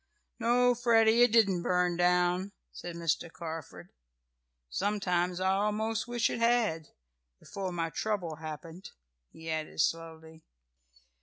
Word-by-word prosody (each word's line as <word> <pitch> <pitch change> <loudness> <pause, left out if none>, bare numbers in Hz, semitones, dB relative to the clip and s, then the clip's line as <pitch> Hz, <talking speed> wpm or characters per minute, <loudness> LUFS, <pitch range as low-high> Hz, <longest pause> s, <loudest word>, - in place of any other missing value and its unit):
"No, 245 +1 +3
Freddie, 230 -1 +4
it 245 -2 +6
didn't 200 -6 +4
burn 180 0 +1
down," 180 +2 +1 0.2
said 175 -1 -8
Mr. 165 0 -1
Carford. 160 - -8 0.8
"Sometimes 180 - -1
I 190 0 +2
almost 210 +3 -1
wish 240 -1 +1
it - - -3
had 230 -10 +1 0.5
before 195 -2 -5
my 165 -2 -2
trouble 180 -7 -2
happened," 160 +3 -8 0.4
he 160 0 -12
added 155 0 -4
slowly. 160 0 -2
180 Hz, 120 wpm, -30 LUFS, 165-220 Hz, 0.8 s, it